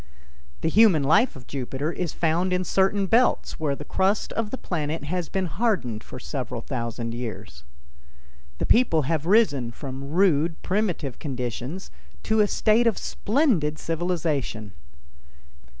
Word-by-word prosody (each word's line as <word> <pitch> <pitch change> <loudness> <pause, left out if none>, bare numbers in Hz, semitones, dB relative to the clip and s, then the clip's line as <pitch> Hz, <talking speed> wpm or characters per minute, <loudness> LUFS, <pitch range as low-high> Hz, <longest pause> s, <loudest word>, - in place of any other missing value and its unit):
The - - 0
human 185 -4 +5
life 205 - +3
of 130 -3 -11
Jupiter 135 +4 -3
is 175 -2 -3
found 170 +3 0
in 180 0 +1
certain 195 +2 +2
belts 235 +6 +2
where 150 -3 0
the 150 - -9
crust 195 +6 0
of 225 -2 -2
the 260 - -4
planet 155 - -3
has 170 +3 -3
been 190 -1 -1
hardened 160 - -1
for 130 - -9
several 125 -3 -4
thousand 115 -2 -4
years. 105 - -7 0.9
The - - -1
people 225 -11 +4
have 160 +2 -1
risen 165 - +3
from 135 +2 -7
rude, 165 -2 +2
primitive 180 - -1
conditions 130 - -5 0.3
to 220 0 +1
a 210 - +5
state 225 +3 +3
of 225 - +1
splendid 205 - +1
civilization. 155 - -2
160 Hz, 140 wpm, -25 LUFS, 135-195 Hz, 0.9 s, human